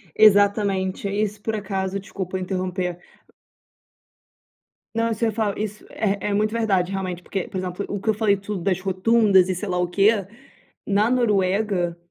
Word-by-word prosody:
Exatamente. 200 -2 +3
Aí, 205 +2 +1
se, 205 +1 -14
por 220 +1 -2
acaso 195 -1 -2
desculpa 190 -2 -5
interromper. 185 -1 -3 2.0
Não, 230 0 +1
você 225 +1 0
fala 215 -2 -1
isso 210 0 -5
é 200 -2 -1
é 200 - 0
muito 215 +1 +1
verdade, 195 -5 +1
realmente, 185 -2 -3
porque, 195 0 -4
por - - -8
exemplo, 185 +1 -3
o 200 - -3
que 220 - +1
eu - - +1
falei 205 -2 +2
tudo 200 -1 -5
das 190 -1 +1
rotundas 190 0 +3
e 185 - 0
sei 195 +3 -5
lá 180 - -1
o 180 0 0
quê. 195 +4 +4 0.8
Na 205 +2 +2
Noruega, 200 -6 +1
200 Hz, 165 wpm, -23 LUFS, 185-210 Hz, 2.0 s, quê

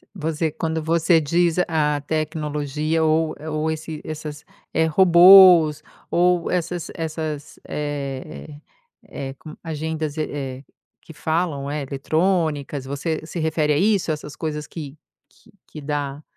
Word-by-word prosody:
Você 160 -1 -2
quando 160 0 -2
você 165 +1 +3
diz 170 +3 +1
a 150 -3 0
tecnologia 155 0 -2
ou 160 0 +1
ou 155 0 -1
esse 160 0 -5
essas, 155 -1 -7 0.3
eh, 160 - +3
robôs, 175 -2 +7 0.3
ou 175 0 +2
essas 175 -1 -2
essas, 155 -3 -5
eh 145 0 -5 0.5
eh, 135 -7 -6
com 155 +2 -11
agendas, 160 -1 -4
eh, 135 -3 -4 0.4
que 160 - -13
falam 155 -2 -2
é, 150 0 -2
eletrônicas, 150 -1 -1
você 150 +4 -3
se 165 +2 -6
refere 155 -1 +1
a - - +1
isso, 200 -3 +2
essas 150 -1 -6
coisas 150 -2 -4
que 150 -3 -8 0.3
que - - -24 0.2
que 155 - -10
dá, 145 0 -3
155 Hz, 130 wpm, -22 LUFS, 150-165 Hz, 0.5 s, robôs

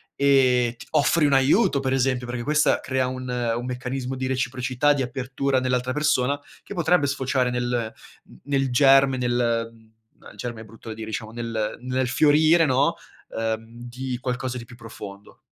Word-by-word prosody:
e 130 -4 +3
t - - -11
offri 155 +1 +3
un 145 - +3
aiuto 140 - +3
per 135 -1 -1
esempio, 130 -1 0
perché 120 0 -4
questa 150 +3 +2
crea 130 -1 -1
un 130 0 -5
un 120 -1 -2
meccanismo 125 +1 -4
di 130 0 -3
reciprocità, 130 +2 +1
di 140 - -2
apertura 130 +2 -1
nell'altra 125 0 -1
persona, 140 -1 +1 0.2
che - - -8
potrebbe 170 -3 +2
sfociare 130 -2 0
nel 120 -2 -2 0.4
n - - -16
nel 135 -1 0
germe 135 +1 +5
nel 120 -2 0
uhm, 110 -1 -22 0.3
no - - -14
il - - -17
germe 115 -2 -5
è - - -9
brutto 115 +1 -13
da - - -4
dire, 110 0 -8
diciamo 110 0 -5
nel 115 -2 -3
nel 130 0 -1
fiorire, 155 +5 +4
no, 140 +5 +2 0.4
uhm, 110 0 -3 0.2
di 125 0 -5
qualcosa 125 0 -3
di 115 - -9
più 125 +1 -14
profondo. 105 -3 -11
130 Hz, 180 wpm, -24 LUFS, 120-135 Hz, 0.4 s, germe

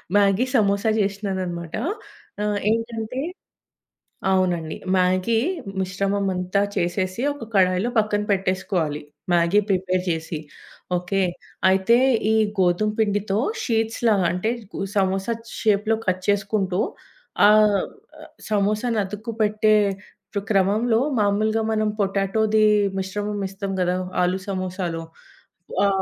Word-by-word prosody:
Maggi 200 +3 +4
samosa 200 -1 +2
చేసినానన్నమాట. 190 -4 -3 0.7
ఆహ్, 210 -1 0
ఏంటంటే 230 +2 -2 1.1
అవునండి, 175 -4 +1 0.2
మ్యాగీ 185 +4 +2 0.4
మిశ్రమం 195 +2 -1
అంతా 180 +2 0
చేసేసి 185 +3 -1
ఒక 285 - -9
కడాయిలో 185 +2 +3
పక్కన 210 -1 +2
పెట్టేసుకోవాలి. 185 -5 -1 0.3
మ్యాగీ 170 +4 +4
ప్రిపేర్ 185 -1 +1
చేసి, 160 -1 -3 0.6
ఓకే. 185 +2 -1 0.5
అయితే 190 +5 +4 0.3
ఈ - - +3 0.3
గోధుమ 180 +4 +2
పిండితో 205 -1 +1 0.3
షీట్స్ 225 -2 0
లాగా, 200 -5 +3
అంటే 180 +5 -1 0.5
సమోసా 195 +2 +1 0.3
షేప్‌లో 215 0 +2
కట్ 185 0 +1
చేసుకుంటూ 200 -2 0 0.7
ఆహ్, 210 -2 +5 0.7
సమోసాను 215 +2 +1
అతుక్కుపెట్టే 215 +1 0 0.8
క్రమంలో 215 +4 +3 0.2
మామూలుగా 215 +2 +1
మనం 215 -1 +1
పొటాటోది 205 +2 +2 0.3
మిశ్రమం 205 +2 -3
ఎస్తాం 195 0 -5
కదా, 180 0 +1 0.3
ఆలు 185 +2 +1
సమోసాలో. 185 -3 -3 0.8
ఆ 200 - +5
200 Hz, 95 wpm, -23 LUFS, 185-215 Hz, 1.1 s, ఆహ్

